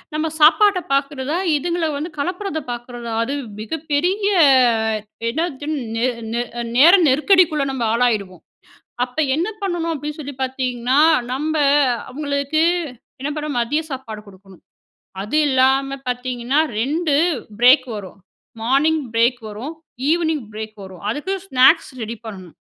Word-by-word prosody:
நம்ம 315 +1 -1
சாப்பாட்டை 365 +5 +5
பாக்குறதா, 275 +2 -1 0.2
இதுங்கள 340 +2 -1
வந்து 315 +4 -5
களப்பறத 360 +2 -3
பார்க்குறதா, 240 -1 -6
அது 275 +5 -3 0.3
மிகப்பெரிய 320 - -1 1.0
என்னது 300 +1 -3 0.3
நே 230 +2 +1 0.3
நே 235 - 0 0.2
அ - - -1 0.2
நேர 330 +7 +8 0.2
நெருக்கடிக்குள்ள 310 +1 +3
நம்ம 260 -3 -3
ஆளாயிடுவோம். 210 -8 0 0.6
அப்ப 250 +5 -14 0.2
என்ன 335 +6 0
பண்ணணும் 345 -3 -1
அப்டின்னு 300 +1 -6
சொல்லி 285 -2 -7
பாத்தீங்கன்னா, 255 0 -1 0.3
நம்ப 310 +4 -2 0.5
அவங்களுக்கு 285 +3 -1 0.6
என்ன 280 +2 -3
பண்ண 305 0 -3
மதிய 285 +7 0
சாப்பாடு 255 -5 -6
குடுக்கணும். 190 -1 -17 0.6
அது 215 +10 -2
இல்லாம 270 +1 +2
பாத்தீங்கன்னா, 250 +2 -1 0.2
2 295 +5 0 0.4
பிரேக் 255 +2 +6
வரும். 195 -1 -9 0.4
மார்னிங் 285 +7 +2
பிரேக் 235 +2 +2
வரும். 235 +10 -6 0.4
ஈவ்னிங் 320 -5 +1
பிரேக் 215 0 -7
வரும். 190 -2 -11
அதுக்கு 300 - -3
ஸ்நாக்ஸ் 265 -6 +4
ரெடி 225 +1 -4
பண்ணணும். 185 -7 -9
275 Hz, 120 wpm, -20 LUFS, 240-315 Hz, 1.0 s, நேர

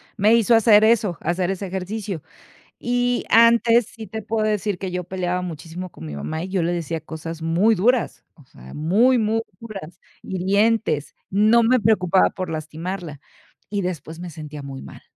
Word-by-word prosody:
me 215 +2 +4
hizo 230 0 +4
hacer 215 -1 +6
eso, 215 -6 +2
hacer 180 +1 0
ese 195 +1 -4
ejercicio. 190 -1 -4 0.6
Y 245 0 0
antes 230 0 +5
sí 220 -1 -8
te 220 +2 -6
puedo 215 +1 -1
decir 210 -2 -1
que 190 -1 -5
yo 180 0 -3
peleaba 180 -1 -2
muchísimo 175 +1 -7
con - - -11
mi 75 -1 -6
mamá, 160 - -4
y 185 - -6
yo 190 -1 0
le 170 +1 0
decía 165 -1 -3
cosas 160 +1 -7
muy 175 +8 +3
duras, 235 +6 +1
o 145 -6 -19
sea, 65 - -14
muy, 215 - +3
muy 220 0 +1 0.2
duras, 195 -6 -9 0.2
hirientes. 195 -3 0 0.2
No 215 +4 +4
me 255 +3 +4
preocupaba 195 -4 +3
por 185 -3 -5
lastimarla, 160 0 -5 0.5
y 200 -1 -1
después 165 -2 -5
me 180 0 -6
sentía 150 -2 -8
muy 135 -1 -8
mal, - - -12
185 Hz, 175 wpm, -22 LUFS, 165-220 Hz, 0.6 s, hacer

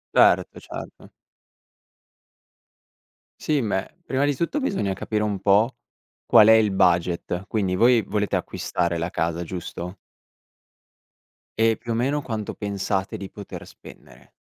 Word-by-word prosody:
Certo, - - +4
certo. - - -10 2.3
Sì, 150 -3 +1
beh, 105 - -3
prima 135 +1 0
di 145 0 +2
tutto 170 - -1
bisogna 105 - -1
capire 105 +2 -2
un 100 -3 -2
po' 105 +5 +3 0.5
qual 110 - +7
è 110 - +9
il 110 -2 +4
budget. 90 0 +1
Quindi, 95 -4 0
voi 120 +2 +5
volete 105 -1 -1
acquistare 85 -1 -2
la 85 +2 -2
casa, 85 -2 -2
giusto? 90 +1 -6 1.6
E 115 -1 +3
più 115 -1 -4
o - - -1
meno, 140 +5 0
quanto 110 -5 -4
pensate 100 -2 -2
di 95 - -7
poter 100 -2 -9
spendere. - - -16
105 Hz, 130 wpm, -24 LUFS, 95-115 Hz, 2.3 s, è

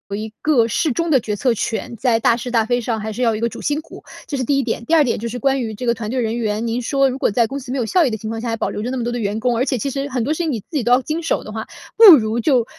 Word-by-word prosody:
一 215 +1 -5
个 255 -7 +3
适 290 +5 0
中 335 +6 -1
的 270 - +5
决 215 -2 -3
策 245 +4 +1
权， 225 0 -3
在 235 0 +2
大 230 0 +2
是 245 +1 -5
大 230 -2 +2
非 245 +2 +1
上 230 -1 -2
还 220 +1 -4
是 225 +4 -5
要 235 -2 +3
有 - - -2
一 - - -4
个 235 - +1
主 - - -9
心 295 +1 -1
骨， - - -13 0.2
这 290 - -4
是 260 - -1
第 280 +3 +1
一 275 - +1
点。 235 -1 -3
第 330 - +2
二 310 - +6
点 245 - -1
就 230 - -4
是 235 +2 -5
关 270 +2 +1
于 225 -2 -4
这 250 - -6
个 235 - +3
团 220 -2 -6
队 255 +2 -1
人 225 0 -2
员， 220 -1 -2
您 235 +2 -1
说 275 +2 +2
如 260 - -4
果 - - +1
在 230 +3 +2
公 270 +4 -5
司 255 -1 -7
没 - - -2
有 245 - 0
效 345 +9 +3
益 - - +1
的 220 - -2
情 220 0 -6
况 225 0 -4
下， 235 - -5
还 230 - -1
保 - - -2
留 - - -5
着 235 - -3
那 260 - -3
么 245 - -2
多 240 - -2
的 240 - -3
员 205 -1 -2
工， 240 +1 0
而 250 - +1
且 265 - 0
其 275 +5 -2
实 275 +1 -3
很 255 -4 -2
多 285 +6 0
事 - - -6
情 320 - -1
你 225 - -3
自 - - -42
己 290 -7 -1
都 245 - +3
要 255 - +4
经 315 +5 -3
手 325 - -1
的 215 - -9
话， 220 0 -5 0.3
不 420 -8 +11
如 220 -2 0
就 245 -1 +2
240 Hz, 405 characters per minute, -19 LUFS, 225-270 Hz, 0.3 s, 不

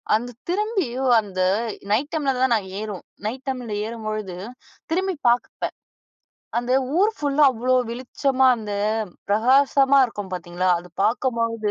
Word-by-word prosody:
அந்த 240 +3 -2 0.2
திரும்பி 410 - 0 0.3
அந்த 190 -3 -8 0.5
நைட் 260 +8 +1
டைம்ல 295 -4 +1
தான் 260 - +3
நாங்க 200 -4 -2
ஏறுவோம். 210 -4 -6 0.2
நைட் 255 +4 -5
டைம்ல 250 -4 -3 0.2
ஏறும்பொழுது, 215 -4 -5 0.6
திரும்பி 375 +2 0
பாப்பேன் 240 +1 -1 0.9
அந்த 240 +1 -1 0.3
ஊர் 415 +3 +4
ஃபுல்லா 290 0 +3
அவ்வளோ 255 +1 0 0.2
வெளிச்சமா 260 +2 +1
அந்த 215 -2 -6 0.6
பிரகாசமா 270 +5 +4
இருக்கும் 205 -4 -7
பார்த்தீங்களா? 180 0 -2
அது 180 - -14
பார்க்கும்போது, 230 0 0
245 Hz, 125 wpm, -23 LUFS, 215-275 Hz, 0.9 s, ஊர்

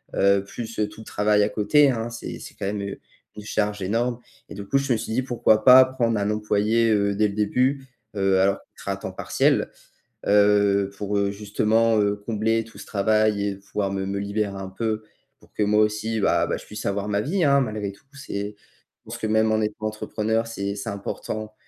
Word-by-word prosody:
heu, 100 0 +4
plus, 115 +3 -7
heu, 105 - +2
tout 105 +1 -12
le - - -12
travail 105 0 +2
à 105 - +1
côté 125 +8 +4
hein, 115 -1 -3
c'est 120 0 -7
c'est - - -10
quand - - -5
même 100 +1 -2
une 100 0 -5 0.5
charge 105 -1 -1
énorme». 115 +5 -1 0.3
Et - - -8
du 100 - -7
coup, 135 - +1
je 135 -2 +1
me - - +1
suis 110 - -5
dit: 120 +4 +1
«Pourquoi 115 -4 +2
pas 130 0 +10
prendre 120 -3 0
un 100 0 0
employé, 105 +2 +1
heu, 100 -1 +2
dès 105 +1 +2
le 100 - -5
début»? 130 +6 +1 0.3
Heu, 95 -1 +2
alors 100 +1 +2
qui - - -30 0.2
sera - - -2
à - - -6
temps - - -6
partiel. - - +1 0.6
Heu, 100 -1 +4
pour, 105 0 -2
heu, 100 0 +1
justement, 110 +2 +1
heu, 100 0 +2
combler 110 +2 -1
tout 115 +1 -16
ce - - -9
travail 105 0 +1
et 100 -1 -2
pouvoir 100 0 -3
me, 95 0 -2
me 100 +1 -3
libérer 100 0 -2
un 95 -1 -6
peu, 110 +2 -3 0.4
pour - - -23
que 105 - 0
moi 105 +1 +3
aussi, 110 +1 0
bah - - +2
bah, - - -1
je - - -9
puisse 105 +1 -8
avoir 100 +1 -1
ma 100 0 +1
vie, 170 - 0
hein, 140 -1 +5
malgré 105 -6 -2
tout, 100 - -21
c'est 105 -7 -5
Je - - -33
pense - - -7
que 110 - -3
même 110 0 +2
en 110 - +2
étant 105 0 -2
entrepreneur, 110 +1 -2
c'est 100 -3 -4
c'est 100 +2 -7
important, 105 +2 -5
105 Hz, 220 wpm, -24 LUFS, 100-115 Hz, 0.6 s, pas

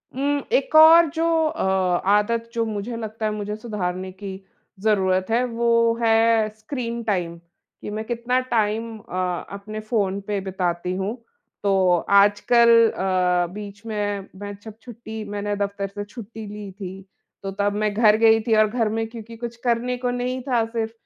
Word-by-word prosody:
उम, 285 +2 0
एक - - +1
और 320 +1 +8
जो 325 +1 +1 0.2
अ, 325 +1 -3 0.4
आदत 225 +3 +2
जो 230 -1 0
मुझे 220 +2 -4
लगता 220 0 -5
है 215 - +1
मुझे 210 0 -4
सुधारने 185 -4 -4
की 195 +1 -8 0.5
ज़रूरत 190 -3 +2
है 240 +2 +3
वो 235 0 -2 0.3
है 225 -1 +3
स्क्रीन 235 0 -4
टाइम 180 -6 -2 0.4
कि - - -6
मैं 215 +1 -4
कितना 240 +2 0
टाइम 220 +1 0
अ, 180 -2 -3
अपने 215 +2 -7
फ़ोन 205 -3 -1
पे 205 -1 -1
बिताती 180 -2 -2
हूँ। 195 +4 -2 0.5
तो 190 -3 +3
आजकल 205 +4 +5 0.2
अ, 180 -2 +1
बीच 210 +1 -9
में 205 -2 -3
मैं 205 0 -5
छप 220 -1 -10
छुट्टी 220 -2 -8 0.3
दफ़्तर 200 0 -2
से 205 +1 -6
छुट्टी 220 0 -9
ली 205 -1 -8
थी। 190 0 -8 0.4
तो 195 - -3
तब 205 0 +1
मैं 210 0 0
घर 215 -1 +5
गई 225 0 +5
थी 220 - +4
और 215 0 +5
घर 225 -1 0
में 225 0 -1
क्योंकि 230 0 -10
कुछ 235 0 -6
करने 245 +1 0
को 250 0 -2
नहीं 250 +1 -2
था 240 -3 +2
सिर्फ़ 225 -1 -3
215 Hz, 165 wpm, -23 LUFS, 200-230 Hz, 0.5 s, और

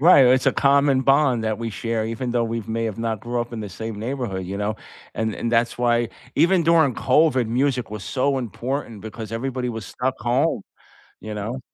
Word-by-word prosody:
Right, 145 -5 +7
it's 130 +1 +4
a - - +5
common 140 -1 +3
bond 135 -4 +3
that 110 -1 0
we 115 -1 -3
share, 110 +2 -2
even 115 +2 -3
though 120 -1 +2
we 115 0 -2
may 115 +2 -2
have 110 -1 -3
not 115 -2 -2
grew 120 0 -2
up 120 0 -5
in 115 - -4
the 105 - -5
same 110 +2 -6
neighborhood, 115 -6 -3
you 95 +2 -5
know? 105 +1 -1 0.4
And 110 -1 -1
and 115 - -2
that's 115 +1 +2
why 120 -1 +2 0.3
even 170 +3 +4
during 160 -6 +4
COVID, 130 -2 +3
music 125 0 0
was 105 - -5
so 135 +3 0
important, 120 0 -4
because 110 0 -7
everybody 125 +2 -3
was 110 -4 -5
stuck 130 +6 -2
home, 120 +1 +1 0.6
you 110 -1 -6
know? 110 +6 -4
120 Hz, 205 wpm, -23 LUFS, 110-130 Hz, 0.6 s, Right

